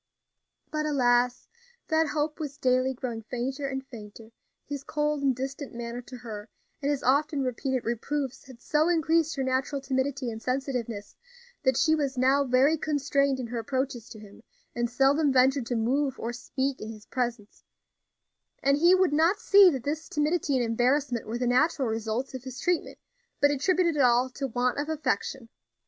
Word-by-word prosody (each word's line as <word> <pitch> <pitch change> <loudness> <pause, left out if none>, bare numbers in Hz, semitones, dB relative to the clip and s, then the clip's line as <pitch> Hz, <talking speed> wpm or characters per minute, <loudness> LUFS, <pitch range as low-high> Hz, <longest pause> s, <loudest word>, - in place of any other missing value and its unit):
But, 305 0 -1
alas! 245 -3 +2 0.4
that 320 0 +3
hope 300 +1 -2
was 290 -3 -5
daily 255 -1 +1
growing 235 -3 -4
fainter 260 +5 -3
and 265 0 -4
fainter; 220 -3 -11 0.3
his 285 -1 -5
cold 300 -1 -1
and 270 -2 +2
distant 270 +1 -5
manner 235 +1 -5
to 250 +1 -10
her 220 -3 -8 0.3
and 280 - 0
his 285 -2 -1
often 285 +2 +2
repeated 255 0 -2
reproofs 265 +4 -3
had 255 -3 -13
so 310 +2 +2
increased 325 -2 +2
her 270 - -1
natural 260 +2 -1
timidity 265 -1 -2
and 220 0 -7
sensitiveness 250 -5 -3 0.5
that 260 -3 +2
she 315 +3 +3
was 280 -4 -1
now 265 +3 +4
very 275 +4 +3
constrained 280 -2 +1
in 255 - -3
her 235 0 -4
approaches 255 -1 -3
to 215 - -10
him, 205 0 -14 0.3
and 240 0 -1
seldom 275 +4 +3
ventured 260 -1 +3
to 245 - -1
move 265 +4 0
or 235 +1 -3
speak 265 +2 -3
in 215 - -6
his 215 -1 -12
presence; 235 -4 -4 1.0
and 275 +1 +4
he 345 +4 +6
would 370 -4 +2
not 330 +6 +3
see 400 -4 +7
that 265 -7 -3
this 300 +3 -3
timidity 300 -1 0
and 250 -2 +2
embarrassment 245 +2 +1
were 225 +2 -3
the 250 - -1
natural 255 +3 +2
results 225 +4 -2
of 260 -1 -6
his 260 -1 -8
treatment, 350 +5 -1 0.4
but 285 0 +4
attributed 340 +3 +1
it 290 - +2
all 250 0 +3
to 275 +1 -3
want 250 +2 0
of 295 +2 -3
affection. 270 -4 -2
265 Hz, 175 wpm, -27 LUFS, 245-290 Hz, 1.0 s, see